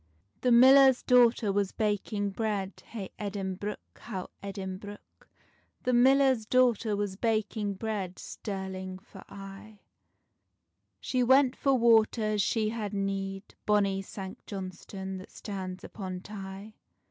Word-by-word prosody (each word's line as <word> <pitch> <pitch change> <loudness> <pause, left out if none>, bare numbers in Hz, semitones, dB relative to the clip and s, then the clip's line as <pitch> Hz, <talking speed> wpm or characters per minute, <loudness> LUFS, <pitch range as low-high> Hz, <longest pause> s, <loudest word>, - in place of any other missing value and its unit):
The 250 - +1
millar's 265 +2 +7
daughter 240 -4 +4
was 200 -1 0
baking 205 -1 -1
bread, 200 -2 -2
Hey 205 -5 -7
Edinbruch, 200 0 -3 0.2
how 190 -5 -6
Edinbruch. 200 +1 -8 0.5
The 250 - +1
millar's 260 -2 +4
daughter 240 -4 +3
was 200 -2 -2
baking 215 -1 -1
bread, 195 -3 -4
Stirling 190 -2 -6
for 190 0 -14
aye: 200 +1 -11 1.2
She 255 - -1
went 260 +1 +5
for 275 -1 +2
water, 230 -1 +4
as 215 -1 +1
she 215 +1 +1
had 215 -2 -4
need, 195 0 -3
Bonny 200 -2 +2
Sanct 190 -1 -9
Johnstonne 190 0 -6
that 185 - -11
stands 190 -3 -6
upon 185 -3 -6
Tay. 195 +1 -8
205 Hz, 120 wpm, -29 LUFS, 195-225 Hz, 1.2 s, millar's